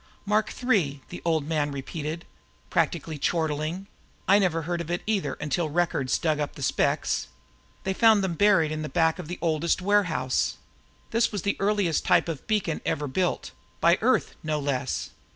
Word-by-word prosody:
"Mark 210 Hz, +1 st, +1 dB
III," 175 Hz, -, +2 dB
the -, -, -8 dB
Old 160 Hz, -3 st, +1 dB
Man 150 Hz, -2 st, 0 dB
repeated, 155 Hz, +4 st, -5 dB, 0.5 s
practically 160 Hz, -2 st, 0 dB
chortling. 160 Hz, +3 st, -1 dB, 0.4 s
"I 200 Hz, +2 st, +6 dB
never 165 Hz, -4 st, +1 dB
heard 170 Hz, +1 st, -2 dB
of 170 Hz, -, -7 dB
it 175 Hz, 0 st, -2 dB
either 210 Hz, -3 st, 0 dB
until 155 Hz, +2 st, -1 dB
Records 150 Hz, -5 st, +1 dB
dug 155 Hz, -2 st, 0 dB
up 145 Hz, -1 st, -3 dB
the 140 Hz, -, -6 dB
specs. -, -, +1 dB, 0.6 s
They 190 Hz, -, 0 dB
found 220 Hz, 0 st, +5 dB
them 190 Hz, -3 st, 0 dB
buried 190 Hz, -4 st, +4 dB
in 155 Hz, 0 st, -3 dB
the 155 Hz, -, -4 dB
back 165 Hz, -1 st, +2 dB
of 175 Hz, -, -6 dB
their 175 Hz, -, -5 dB
oldest 165 Hz, +1 st, +1 dB
warehouse. 180 Hz, -10 st, +1 dB, 0.5 s
This 230 Hz, +1 st, +2 dB
was 205 Hz, -5 st, -3 dB
the 200 Hz, -, +1 dB
earliest 200 Hz, -5 st, +1 dB
type -, -, +3 dB
of 160 Hz, -5 st, -5 dB
beacon 205 Hz, -7 st, 0 dB
ever 150 Hz, -1 st, -1 dB
built 180 Hz, +6 st, -1 dB, 0.3 s
by -, -, +4 dB
Earth, -, -, +2 dB
no 155 Hz, -1 st, -1 dB
less. 140 Hz, -2 st, -2 dB
165 Hz, 170 wpm, -26 LUFS, 150-190 Hz, 0.6 s, I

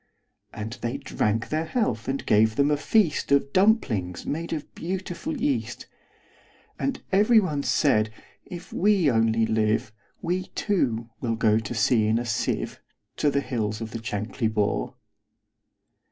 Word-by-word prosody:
And 110 Hz, +3 st, -6 dB
they 120 Hz, +3 st, -2 dB
drank 115 Hz, -5 st, -1 dB
their 155 Hz, +1 st, -1 dB
health, 155 Hz, -, -1 dB
and 135 Hz, +1 st, -2 dB
gave 110 Hz, +1 st, +4 dB
them 140 Hz, +3 st, +3 dB
a -, -, +4 dB
feastOf 145 Hz, -5 st, +2 dB
dumplings 125 Hz, -, +2 dB
made 165 Hz, +3 st, -3 dB
of 155 Hz, -3 st, -5 dB
beautiful 185 Hz, -, -4 dB
yeast; 285 Hz, -1 st, -1 dB, 0.9 s
And 275 Hz, -1 st, -2 dB
every 210 Hz, +4 st, +5 dB
one 155 Hz, -8 st, -1 dB
said, 110 Hz, -7 st, +2 dB, 0.3 s
"If 175 Hz, -1 st, -9 dB
we 190 Hz, -6 st, +3 dB
only 115 Hz, -1 st, +2 dB
live, 110 Hz, 0 st, 0 dB, 0.3 s
We, 180 Hz, +2 st, -2 dB
too, 120 Hz, -, 0 dB
will 115 Hz, -2 st, -1 dB
go 110 Hz, -1 st, +3 dB
to 110 Hz, +2 st, -5 dB
sea 110 Hz, 0 st, +3 dB
in 110 Hz, +1 st, +2 dB
a 120 Hz, -, -2 dB
sieve, 115 Hz, -, -2 dB, 0.4 s
To 150 Hz, -, +2 dB
the 140 Hz, 0 st, +1 dB
hills 110 Hz, -5 st, -2 dB
of 110 Hz, -1 st, -6 dB
the 115 Hz, -, -5 dB
Chankly 110 Hz, +2 st, -2 dB
Bore." 105 Hz, -2 st, -1 dB
130 Hz, 145 wpm, -25 LUFS, 110-170 Hz, 0.9 s, every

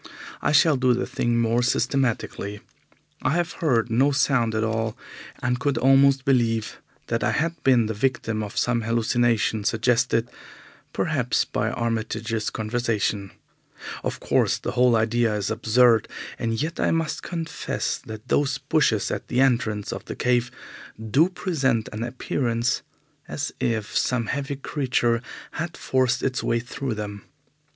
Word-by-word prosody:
I -, -, +1 dB
shall 150 Hz, 0 st, +5 dB
do 125 Hz, -1 st, +3 dB
the 125 Hz, -, -1 dB
thing 120 Hz, 0 st, -1 dB
more 115 Hz, +1 st, +2 dB
systematically. 120 Hz, -5 st, -1 dB, 0.6 s
I -, -, +1 dB
have 175 Hz, 0 st, 0 dB
heard 120 Hz, -7 st, +2 dB
no 130 Hz, +5 st, +4 dB
sound 125 Hz, -4 st, +2 dB
at 110 Hz, -, +1 dB
all, 110 Hz, 0 st, -1 dB, 0.5 s
and 125 Hz, -1 st, 0 dB
could 140 Hz, -1 st, 0 dB
almost 135 Hz, +2 st, +4 dB
believe 115 Hz, -5 st, +1 dB, 0.3 s
that -, -, -1 dB
I -, -, +2 dB
had 165 Hz, +2 st, -1 dB
been 125 Hz, -4 st, +4 dB
the 110 Hz, -, -2 dB
victim 115 Hz, -1 st, -1 dB
of 105 Hz, -1 st, -6 dB
some 120 Hz, -1 st, +1 dB
hallucination 115 Hz, -1 st, +1 dB
suggested, 115 Hz, +1 st, +1 dB, 0.6 s
perhaps, -, -, 0 dB
by -, -, -1 dB
Armitage's 115 Hz, -1 st, -2 dB
conversation. 110 Hz, -3 st, -1 dB, 0.7 s
Of -, -, -3 dB
course, -, -, +2 dB
the -, -, -4 dB
whole 125 Hz, -1 st, +4 dB
idea 115 Hz, 0 st, +2 dB
is 100 Hz, -2 st, -2 dB
absurd, 115 Hz, -1 st, +4 dB, 0.3 s
and 115 Hz, -1 st, -1 dB
yet 160 Hz, +4 st, -3 dB
I -, -, +2 dB
must 165 Hz, -1 st, -1 dB
confess 165 Hz, -2 st, -3 dB
that 110 Hz, +2 st, -10 dB
those 135 Hz, +1 st, +1 dB
bushes 135 Hz, -6 st, +1 dB
at -, -, -4 dB
the 125 Hz, -, -1 dB
entrance 115 Hz, -6 st, +1 dB
of -, -, -7 dB
the -, -, -6 dB
cave 125 Hz, -1 st, +1 dB, 0.5 s
do 135 Hz, -, +3 dB
present 135 Hz, -, 0 dB
an 105 Hz, -, -5 dB
appearance 120 Hz, -1 st, -1 dB, 0.5 s
as -, -, -3 dB
if 110 Hz, -3 st, -1 dB
some 125 Hz, -3 st, +1 dB
heavy 140 Hz, +4 st, -3 dB
creature 125 Hz, -4 st, 0 dB, 0.3 s
had 165 Hz, +1 st, -5 dB
forced 130 Hz, -1 st, +1 dB
its 130 Hz, -2 st, 0 dB
way 115 Hz, -, +1 dB
through 125 Hz, 0 st, -4 dB
them. 105 Hz, -1 st, -6 dB
120 Hz, 145 wpm, -24 LUFS, 110-135 Hz, 0.7 s, shall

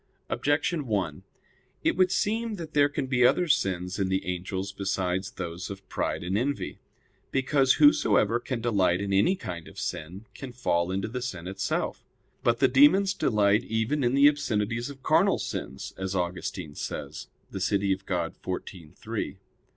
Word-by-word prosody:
Objection 145 Hz, +5 st, 0 dB
1: 95 Hz, -9 st, -1 dB, 0.6 s
It -, -, +2 dB
would 185 Hz, 0 st, +3 dB
seem 220 Hz, +3 st, 0 dB
that 165 Hz, -4 st, -8 dB
there 145 Hz, -1 st, +4 dB
can 145 Hz, -1 st, -2 dB
be 125 Hz, -2 st, +2 dB
other 175 Hz, +8 st, +4 dB
sins 90 Hz, -, 0 dB
in 95 Hz, -1 st, +1 dB
the 95 Hz, 0 st, 0 dB
angels 95 Hz, +2 st, -3 dB
besides 95 Hz, -1 st, -1 dB
those 85 Hz, +1 st, -6 dB
of 100 Hz, -1 st, -9 dB
pride -, -, -2 dB
and 90 Hz, +2 st, -2 dB
envy. 135 Hz, +6 st, -2 dB, 0.5 s
Because 135 Hz, 0 st, +3 dB
whosoever 115 Hz, -6 st, +4 dB
can 120 Hz, -1 st, -4 dB
delight 95 Hz, -6 st, +2 dB
in 100 Hz, 0 st, -2 dB
any 100 Hz, -, +4 dB
kind 85 Hz, -, -7 dB
of -, -, -14 dB
sin, 90 Hz, +8 st, -5 dB
can 130 Hz, -3 st, -8 dB
fall 85 Hz, -8 st, 0 dB
into 95 Hz, +1 st, -1 dB
the 125 Hz, +3 st, -4 dB
sin 90 Hz, -9 st, -5 dB
itself. 95 Hz, +1 st, -2 dB, 0.4 s
But 120 Hz, 0 st, +2 dB
the 130 Hz, +2 st, +4 dB
demons 150 Hz, +10 st, +5 dB
delight 105 Hz, -, +2 dB
even 115 Hz, +6 st, 0 dB
in 120 Hz, +2 st, +2 dB
the 140 Hz, +1 st, +7 dB
obscenities 120 Hz, -5 st, 0 dB
of 135 Hz, -2 st, -11 dB
carnal -, -, +4 dB
sins; 65 Hz, -, -5 dB
as 95 Hz, 0 st, -3 dB
Augustine 90 Hz, -2 st, -3 dB
says -, -, -6 dB, 0.2 s
(De 95 Hz, -, -4 dB
Civ. 100 Hz, +1 st, +1 dB
Dei 100 Hz, -1 st, +2 dB, 0.3 s
xiv, 90 Hz, -3 st, -7 dB
3). -, -, -4 dB
105 Hz, 165 wpm, -27 LUFS, 95-135 Hz, 0.6 s, the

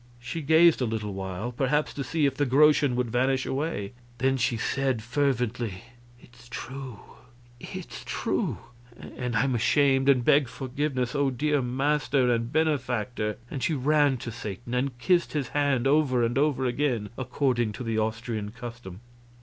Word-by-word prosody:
She 160 Hz, +7 st, -5 dB
gazed 160 Hz, +1 st, +5 dB
a -, -, +2 dB
little 110 Hz, -3 st, -3 dB
while, 95 Hz, +4 st, -4 dB
perhaps 140 Hz, +4 st, 0 dB
to 140 Hz, -, -4 dB
see 155 Hz, +1 st, 0 dB
if 140 Hz, -, +2 dB
the 145 Hz, -, 0 dB
groschen 145 Hz, 0 st, +4 dB
would 125 Hz, -2 st, -1 dB
vanish 130 Hz, +2 st, +1 dB
away; 135 Hz, -7 st, -3 dB, 0.2 s
then 135 Hz, +2 st, +2 dB
she 120 Hz, -2 st, 0 dB
said, 130 Hz, -1 st, -1 dB
fervently: 120 Hz, -5 st, -1 dB, 0.4 s
"It's 120 Hz, 0 st, -18 dB
true 130 Hz, -2 st, -7 dB, 0.6 s
it's -, -, -8 dB
true -, -, -1 dB, 0.4 s
and 125 Hz, -2 st, -5 dB
I'm 130 Hz, +4 st, +2 dB
ashamed 135 Hz, +3 st, +3 dB
and 125 Hz, -3 st, +4 dB
beg 140 Hz, -2 st, +4 dB
forgiveness, 130 Hz, +1 st, -2 dB
O 140 Hz, -1 st, +2 dB
dear 145 Hz, +3 st, 0 dB
master 130 Hz, 0 st, +1 dB
and 115 Hz, +1 st, -2 dB
benefactor!" 125 Hz, -8 st, -1 dB
And 135 Hz, -, -4 dB
she 160 Hz, -, +1 dB
ran 145 Hz, 0 st, +3 dB
to 120 Hz, -, -4 dB
Satan 110 Hz, +2 st, -7 dB
and 125 Hz, 0 st, -1 dB
kissed 175 Hz, +7 st, +1 dB
his 140 Hz, -5 st, -2 dB
hand, 140 Hz, -2 st, +1 dB
over 135 Hz, -4 st, +3 dB
and 115 Hz, +1 st, 0 dB
over 140 Hz, -2 st, +1 dB
again, 120 Hz, -4 st, 0 dB
according 125 Hz, -3 st, 0 dB
to 125 Hz, -, -6 dB
the 115 Hz, -1 st, -1 dB
Austrian 110 Hz, -1 st, -2 dB
custom. 115 Hz, -4 st, -9 dB
125 Hz, 160 wpm, -27 LUFS, 120-140 Hz, 0.6 s, gazed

